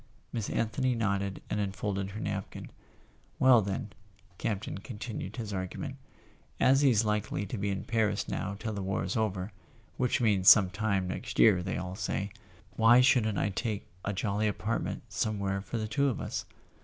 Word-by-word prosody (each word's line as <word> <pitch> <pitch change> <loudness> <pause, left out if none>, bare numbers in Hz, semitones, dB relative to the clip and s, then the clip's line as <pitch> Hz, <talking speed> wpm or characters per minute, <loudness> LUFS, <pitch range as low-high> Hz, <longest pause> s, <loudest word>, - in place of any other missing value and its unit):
Miss 110 -3 -2
Anthony 120 +3 0
nodded 100 -3 -1
and 105 - -2
unfolded 100 -1 -2
her 105 +2 -7
napkin. 100 -2 -5 0.7
"Well, 130 -3 +6
then," 100 +1 -4 0.5
Campton 105 -2 -3
continued 110 -2 -6
his 110 -4 -5
argument, 95 -1 -4 0.6
"as 135 +2 +5
he's 120 -6 +4
likely 105 -2 -1
to 100 - -5
be 100 -1 -1
in 100 0 -2
Paris 110 -2 0
now 100 +1 -3
till 110 +1 -4
the 100 - -4
war 95 -3 -1
is 90 - -3
over— 105 -3 -1 0.5
which 125 -1 +1
means 100 -6 +5
some 95 -4 +7
time 100 -3 0
next 90 - -5
year, 100 -5 +6
they 95 +1 -3
all 90 0 -4
say—why 105 +4 +1
shouldn't 115 -6 +3
I - - +1
take 105 +1 -3 0.2
a 100 - -1
jolly 105 +2 0
apartment 105 +2 -2
somewhere 100 -1 -1
for 115 - -5
the 110 -1 -2
two 140 +6 +1
of 125 - -3
us - - -4
105 Hz, 170 wpm, -30 LUFS, 95-110 Hz, 0.7 s, some